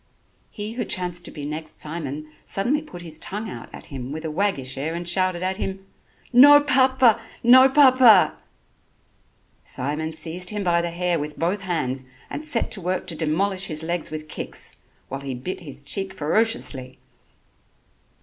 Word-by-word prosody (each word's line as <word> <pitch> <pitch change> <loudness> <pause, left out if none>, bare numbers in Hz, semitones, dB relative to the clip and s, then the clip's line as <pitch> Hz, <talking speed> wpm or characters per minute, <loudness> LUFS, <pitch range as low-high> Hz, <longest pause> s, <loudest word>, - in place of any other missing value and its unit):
He 210 0 -6
who 245 - -2
chanced 175 -2 -2
to - - -5
be 145 -2 -7
next 155 +1 -6
Simon 155 -1 -5
suddenly 250 +10 0
put 175 - -10
his 160 -2 -4
tongue 210 +6 -5
out 120 - -8
at - - -10
him 130 -1 -6
with 155 +2 -6
a 160 - -3
waggish 150 -7 -1
air 155 +5 -3
and 170 0 -5
shouted 185 0 +1
at 190 +1 -1
him: 195 -2 -4 0.5
"No 290 +4 +9
papa! 260 -5 +4 0.2
No 260 +3 +8
papa!" 255 -7 +6 1.3
Simon 150 +5 -3
seized 170 +3 -1
him 210 -1 -2
by 170 -2 +2
the 170 - -2
hair 175 0 -1
with 150 +1 -5
both 180 +4 -1
hands 135 -8 -2 0.3
and 300 - -5
set 290 -7 0
to 195 - -3
work 180 +1 -2
to 175 -3 -2
demolish 185 +5 0
his 155 -2 -2
legs 170 0 -2
with 155 0 -6
kicks, - - -4 0.3
while 135 +1 -6
he 135 -2 -4
bit 185 +10 -5
his 145 -5 -8
cheek 195 +6 -5
ferociously. 150 - 0
175 Hz, 170 wpm, -23 LUFS, 155-205 Hz, 1.3 s, No